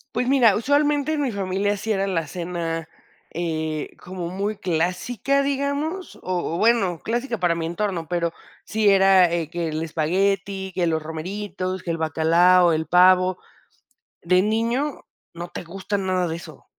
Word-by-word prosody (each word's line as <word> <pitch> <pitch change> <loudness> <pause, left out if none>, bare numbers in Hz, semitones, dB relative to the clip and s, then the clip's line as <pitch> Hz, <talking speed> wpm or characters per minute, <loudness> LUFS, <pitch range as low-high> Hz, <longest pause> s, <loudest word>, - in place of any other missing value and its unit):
Pues 250 +1 0
mira, 245 -7 +5
usualmente, 290 +4 +1
en 295 - -1
mi 265 -4 0
familia 200 +1 -1
sí 220 +3 -3
era 195 -1 0
la 165 -5 -1
cena, 170 -1 -4 0.4
eh, 160 -2 -3
como 180 -2 -6
muy 200 +3 -3
clásica, 185 +11 0
digamos, 285 +6 -2
o 175 -2 -2
o - - -2
bueno, 200 -7 +2
clásica 240 -1 -2
para 175 -2 +2
mi 165 -1 -3
entorno, 175 -2 -2
pero 170 -1 -1 0.3
sí 215 -1 +2
era 190 -2 +6
eh 165 -3 -1
que 170 -1 -3
el 155 +1 -3
espagueti, 190 +4 -1
que 175 -2 0
los 160 -1 0
romeritos, 185 +3 -5
que 170 - -2
el 165 - -2
bacalao, 170 +3 +4
el 160 0 -1
pavo. 185 +1 +5 0.8
De 180 +2 +3
niño 230 +7 -1 0.3
no 170 +1 -6
te - - -7
gusta 195 +4 -4
nada 185 -2 0
de 160 - -3
eso. 170 - -11
185 Hz, 160 wpm, -23 LUFS, 170-210 Hz, 0.8 s, era